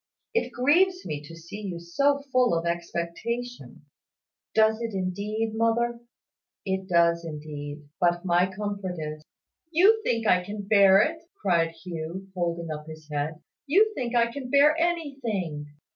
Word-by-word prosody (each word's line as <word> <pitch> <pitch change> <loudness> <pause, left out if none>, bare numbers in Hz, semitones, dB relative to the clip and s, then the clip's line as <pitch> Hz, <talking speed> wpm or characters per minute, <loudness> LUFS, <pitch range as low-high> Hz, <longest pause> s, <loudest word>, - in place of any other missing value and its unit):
It 465 - 0
grieves 360 +9 +3
me 145 -1 -4
to 165 - -10
see 170 +6 -9
you 185 -5 -5
so 280 +12 +1
full 250 -8 +3
of 165 - -3
expectation 170 +8 -4 0.3
" - - -57
"Does 220 +1 +4
it 230 -3 -3
indeed, 205 +4 -2
mother?" 235 +1 +1 0.7
"It 190 0 -2
does 170 -1 +3
indeed. 150 -2 -7
But 175 0 +2
my 175 0 +3
comfort 200 -2 -4
is 155 -1 -5 0.3
" - - -63
"You 400 +7 +5
think 230 - 0
I 180 -3 +4
can 205 +2 -6
bear 200 -1 +6
it," 325 +1 -3 0.2
cried 170 -4 +2
Hugh, 180 +2 -6
holding 170 -2 -2
up 150 0 -6
his 155 -1 -11
head. 150 +2 -3 0.2
"You 420 +9 +4
think 245 - -3
I 235 0 +3
can 255 0 -6
bear 285 +3 +5
anything." 270 - -2
195 Hz, 155 wpm, -26 LUFS, 170-245 Hz, 0.7 s, bear